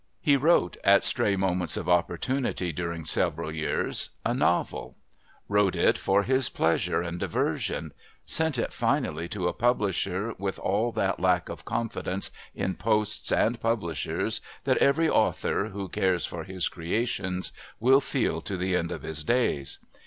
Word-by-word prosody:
He 145 -4 +3
wrote, 140 - +2
at - - +5
stray 100 - +3
moments 90 -3 +1
of - - -4
opportunity 90 +3 0
during 85 0 -4
several 80 0 0
years, 80 -1 -1 0.2
a - - +1
novel, - - -1 0.5
wrote 100 -2 +2
it - - +3
for 100 +1 +1
his 130 +2 +3
pleasure 85 +1 0
and 85 0 -5
diversion, 80 -2 -1 0.3
sent 160 -4 +5
it 115 - -2
finally 80 +3 -1
to 90 -1 -2
a - - -1
publisher 105 -3 0
with 95 0 -3
all 110 +5 0
that 95 0 -1
lack 90 -1 +1
of - - -8
confidence 115 -4 -1 0.2
in 95 - -2
posts 105 -1 0
and 115 +1 +1
publishers 100 - -1 0.2
that - - +2
every 160 +4 +3
author, 105 - +1
who 100 -2 -6
cares 90 -1 0
for 80 -2 -6
his 95 -1 -1
creations, 95 +1 -2 0.3
will 130 +4 +5
feel 130 - -1
to 95 - -3
the 90 0 -1
end 85 -2 -1
of - - -6
his 75 -1 -2
days. 75 - +1
95 Hz, 150 wpm, -27 LUFS, 85-115 Hz, 0.5 s, at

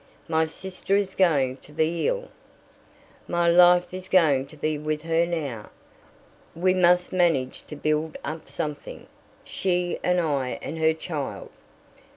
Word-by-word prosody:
"My 160 0 +1
sister 190 +3 -3
is 200 -2 0
going 140 -8 +2
to 145 - -18
be 160 +2 0
ill. - - -2 1.0
My 175 0 +1
life 175 +1 +5
is 185 0 -7
going 145 -8 +3
to 155 - -15
be 155 +1 -1
with 150 0 -3
her 165 +1 +1
now. 140 -11 -4 0.9
We 185 +2 +2
must 180 -1 +3
manage 165 -8 +1
to 150 - -7
build 155 +1 -1
up 155 0 -6
something, 145 +1 -5 0.4
she 180 -2 -1
and 180 0 +2
I 140 -6 -1
and 160 - -5
her 160 0 +3
child." 155 -4 -5
165 Hz, 145 wpm, -25 LUFS, 150-180 Hz, 1.0 s, life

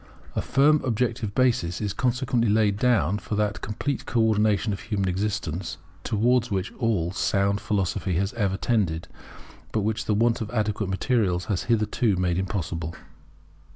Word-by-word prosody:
A - - +1
firm 145 +3 +4
objective 115 -3 -1
basis 115 -10 +2
is 105 -2 -2
consequently 125 -3 +1
laid 105 -1 +3
down 105 - +2
for 105 - -4
that 105 0 -1
complete 125 +6 -3
co 120 - 0
ordination 110 -1 +2
of 100 - -5
human 105 -3 -2
existence 95 -2 -2 0.3
towards 120 +3 +2
which 95 -1 -2
all 105 -9 +1
sound 100 +1 +1
Philosophy 100 -3 -1
has 95 +3 0
ever 100 -5 0
tended, 95 -10 0 0.6
but 110 - 0
which 110 +1 -1
the 105 - +1
want 115 +2 +2
of 110 - -3
adequate 105 -3 -1
materials 95 -3 +1
has 90 - -2
hitherto 110 -1 +2
made 90 -1 0
impossible. 85 -4 -3
105 Hz, 155 wpm, -25 LUFS, 95-115 Hz, 0.6 s, firm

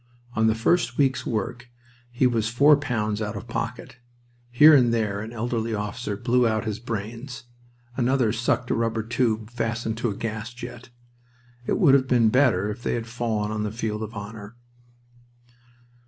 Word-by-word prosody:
On 110 0 +3
the 110 - +2
first 120 +1 +1
week's 135 -2 +1
work 120 +2 -3 0.4
he 120 +1 +1
was 115 -3 +1
four 140 +5 +6
pounds 110 -7 -2
out 105 -1 -3
of - - -9
pocket... 120 +2 -5 0.5
Here 150 +6 +7
and 125 -5 +5
there 105 -4 0
an 110 +1 -7
elderly 115 -1 -2
officer 105 0 -4
blew 120 +1 +2
out 110 0 -1
his 110 -1 -3
brains. 120 +4 -6 0.5
Another 125 -3 +1
sucked 120 +2 0
a - - +3
rubber 115 -1 -1
tube 115 -1 -1
fastened 115 -1 -3
to 120 - 0
the 100 - -5
gas 115 +2 -5
jet... 120 0 -9 0.8
It - - +1
would 160 -9 +5
have 135 -1 +4
been 120 -3 +4
better 110 -6 +2
if 115 +3 -8
they - - -1
had 115 -1 -3
fallen 115 -3 -2
on 110 0 -2
the 105 - -1
field 110 -1 -3
of 110 +1 -6
honor. 105 +1 -8
115 Hz, 170 wpm, -24 LUFS, 110-125 Hz, 0.8 s, Here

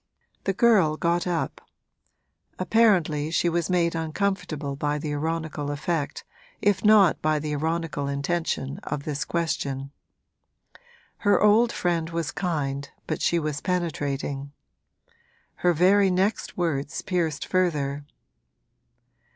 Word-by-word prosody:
The 195 - +1
girl 195 -9 +4
got 170 +2 0
up; 170 -2 -2 1.0
apparently 185 -8 +3
she 170 +1 +1
was 170 0 -1
made 170 -2 +2
uncomfortable 160 -3 -2
by 145 +1 -1
the 150 0 -3
ironical 155 -1 -2
effect, 145 +1 -2 0.4
if 205 -2 +1
not 210 -5 +5
by 155 0 +2
the 150 0 -3
ironical 160 -1 -2
intention, 140 -1 -2
of 140 - -4
this 145 -1 -2
question. 140 -5 -2 1.3
Her 205 -1 +3
old 220 +3 +5
friend 170 -2 -1
was 165 -2 -2
kind 140 -6 -2 0.2
but - - -3
she 170 - +2
was 150 -3 -2
penetrating; 145 -6 -2 1.1
her 180 - +3
very 190 +4 +4
next 190 +4 0
words 145 -5 -2
pierced 160 -5 -1
further. 145 -6 0
165 Hz, 115 wpm, -25 LUFS, 145-180 Hz, 1.3 s, not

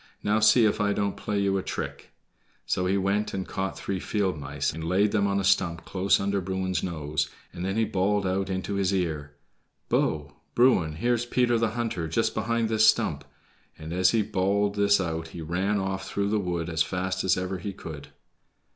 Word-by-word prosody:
"Now, 105 +1 +2
see 110 +2 +6
if 105 0 +1
I 100 0 +2
don't 100 -1 -1
play 105 - -3
you 100 -1 +1
a - - -2
trick." - - -5 0.5
So 90 - 0
he 95 +2 +2
went 100 +2 0
and 95 -1 -3
caught 95 0 -3
three 95 -1 -3
field 95 -2 -1
mice 75 - -3
and 80 +1 -6
laid 95 +5 +2
them 100 -2 +2
on 100 0 +1
a - - -1
stump 85 -3 +1
close 95 +1 +2
under 100 0 0
Bruin's 95 -1 -2
nose, 75 -3 -2 0.2
and 85 - -6
then 95 +3 -1
he 115 - +3
bawled 100 +1 0
out 95 +1 -1
into 95 +1 -2
his 100 -1 +1
ear, 75 -5 -2 0.5
"Bo! 75 -2 0 0.2
Bruin, 120 -11 +4
here's 120 +6 0
Peter 120 -1 +2
the 115 0 0
Hunter, 110 -9 -2
just 95 +8 0
behind 115 +1 0
this 110 0 +4
stump"; 110 -10 +2 0.5
and 80 +1 -7
as 95 +1 +4
he 110 0 +2
bawled 100 0 +1
this 100 0 +3
out 80 -3 -2
he 85 +1 -8
ran 95 +6 0
off 95 0 -3
through 100 0 -1
the 105 0 +1
wood 85 -4 -2
as 80 -1 -1
fast 95 +1 -1
as 95 -1 +3
ever 95 0 -3
he 100 +4 -4
could. 80 -6 -9
95 Hz, 200 wpm, -27 LUFS, 90-105 Hz, 0.5 s, see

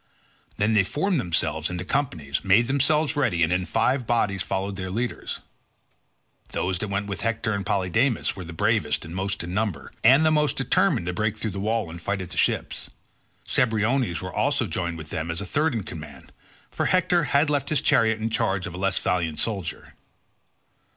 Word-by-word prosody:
Then 105 +2 +2
they 105 -3 +5
formed 165 - 0
themselves 80 -5 -1
into 90 0 -4
companies, 85 - -1
made 100 +4 +5
themselves 145 +3 +2
ready, 115 -13 +2
and 80 +2 +2
in 90 0 0
five 125 +4 +1
bodies 105 -5 +1
followed 95 +1 -2
their 95 -1 -4
leaders. 120 +5 -3 1.1
Those 90 -1 -1
that 105 - -2
went 100 +1 -2
with 100 -1 -5
Hector 110 -1 -1
and 100 -1 -2
Polydamas 100 +7 +1
were 95 - -7
the 85 - -8
bravest 80 - 0
and 80 - -8
most 95 0 -2
in 90 +1 -5
number, 100 -8 -2
and 135 +7 +6
the 155 - +4
most 150 -3 +2
determined 85 - +2
to 90 - -2
break 110 +3 -1
through 110 -1 -3
the 95 - -5
wall 110 -3 -1
and 85 +1 -8
fight 100 +3 -1
at 90 - -10
the - - -6
ships. - - 0 0.6
Cebriones 115 -3 +1
was - - -6
also - - +1
joined 85 -1 -3
with 80 -1 -9
them 80 +1 -3
as 85 +1 -2
third 145 +8 0
in 110 - -2
command, 75 -8 -10 0.4
for - - -1
Hector 180 -2 +3
had 145 +3 +2
left 145 -2 0
his 155 - +2
chariot 115 -6 +3
in 110 +1 -2
charge 95 -3 0
of 95 - -6
a - - -6
less 95 0 +1
valiant 85 -4 0
soldier. 95 -8 -3
100 Hz, 190 wpm, -25 LUFS, 90-125 Hz, 1.1 s, and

